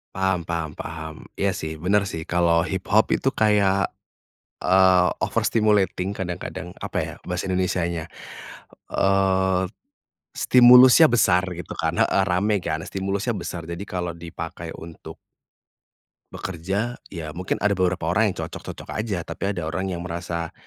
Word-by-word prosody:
Paham 95 -1 +1
paham 85 -2 -2
paham. 80 -1 -7 0.2
Iya 100 0 +2
sih, 80 -2 -5
benar 100 +3 +3
sih, 80 - -4
kalau 85 -1 +3
hiphop 100 +3 +2
itu 135 - +1
kayak, 100 -3 +4 0.9
eee, 95 -1 +5 0.2
overstimulating 105 -4 +1
kadang-kadang. 90 -1 -5 0.2
Apa - - -4
ya, - - -7
bahasa 90 0 -2
Indonesianya? 85 -3 -1 0.9
Eee, 95 -1 +2 0.7
stimulusnya 125 +4 +8
besar 90 -6 +4 0.2
gitu 90 - -7
kan - - 0
heeh, 95 - +2
rame 100 +3 +1
kan? 80 - -2
Stimulusnya 100 +4 -2
besar, 85 -2 -5
jadi 85 +3 -5
kalau 90 -3 -3
dipakai 85 0 -7
untuk 80 0 -10 1.1
bekerja, 95 +7 -3 0.2
ya, 80 -4 -6
mungkin 90 +2 -2
ada 105 0 +1
beberapa 90 -2 0
orang 95 +6 +2
yang 95 - -6
cocok-cocok - - -9
aja, 100 -6 -3
tapi 100 - -3
ada 90 -5 -3
orang 95 +4 -3
yang 85 -1 -4
merasa, 85 -1 -4
95 Hz, 135 wpm, -23 LUFS, 85-100 Hz, 1.1 s, stimulusnya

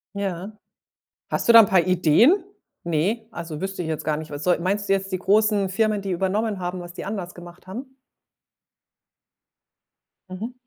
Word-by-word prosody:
Ja. 195 0 -4 0.8
Hast - - -2
du - - +8
da 230 - +11
'n 220 - +8
paar 185 -3 +3
Ideen? 185 - +5 0.5
Ne, 185 +8 -1
also, 165 -5 -7
wüsste 190 -1 -4
ich 160 - -4
jetzt 155 - -4
gar 155 -1 +1
nicht. 155 0 -7
Was 145 +1 -6
soll 175 -2 +3
meinst 200 +3 -1
du - - +3
jetzt 195 0 -2
die 185 - -2
großen 205 +1 +2
Firmen, 215 +1 0
die 195 -1 -4
übernommen 195 +3 -1
haben, 180 +1 -4
was 175 0 -9
die - - -7
anders 195 -3 -5
gemacht 175 +1 -13
haben? 260 +7 -8 2.3
Mhm. 215 +7 -6
190 Hz, 175 wpm, -23 LUFS, 175-210 Hz, 2.3 s, da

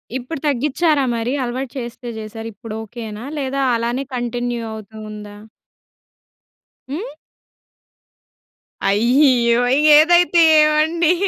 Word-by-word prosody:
ఇప్పుడు 260 +4 -5
తగ్గిచ్చారా 295 +2 +1
మరి? 230 +2 -2
అలవాటు 250 +1 -4
చేస్తే 240 0 -7
చేసారు. 225 +1 -8
ఇప్పుడు 215 +2 -9
ఓకేనా? 220 0 -8 0.2
లేదా 275 0 -2
అలానే 235 +3 -2
కంటిన్యూ 240 0 -3
అవుతు 220 0 -11 0.2
ఉందా? 210 -1 -10 1.6
హ్మ్? 335 - -6 1.7
అయ్యో! 240 +2 +3 0.4
ఏదైతే 345 +2 +5 0.2
ఏమండి 310 +3 +2
245 Hz, 90 wpm, -19 LUFS, 230-295 Hz, 1.7 s, ఏదైతే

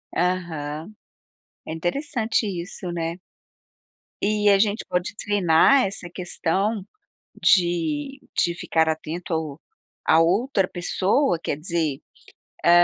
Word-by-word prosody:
Aham, 170 -1 -2 0.7
é 160 - -3
interessante 225 - -1
isso 180 -1 -5
né. 170 +1 -3 1.0
E 210 0 +2
a 195 -1 +5
gente 210 0 +1
pode 180 +3 -1
treinar 205 +6 +4
essa 190 -2 -3
questão 190 +3 -1 0.6
de 215 - +2 0.2
de 170 0 +2
ficar 160 -2 +1
atento 160 +2 -3
ao 160 -2 -3 0.5
a 160 - +6
outra 195 +3 +2
pessoa, 190 - +1
quer 145 - -2
dizer, 160 -3 -1 0.7
ah, - - +6
180 Hz, 110 wpm, -24 LUFS, 165-205 Hz, 1.0 s, a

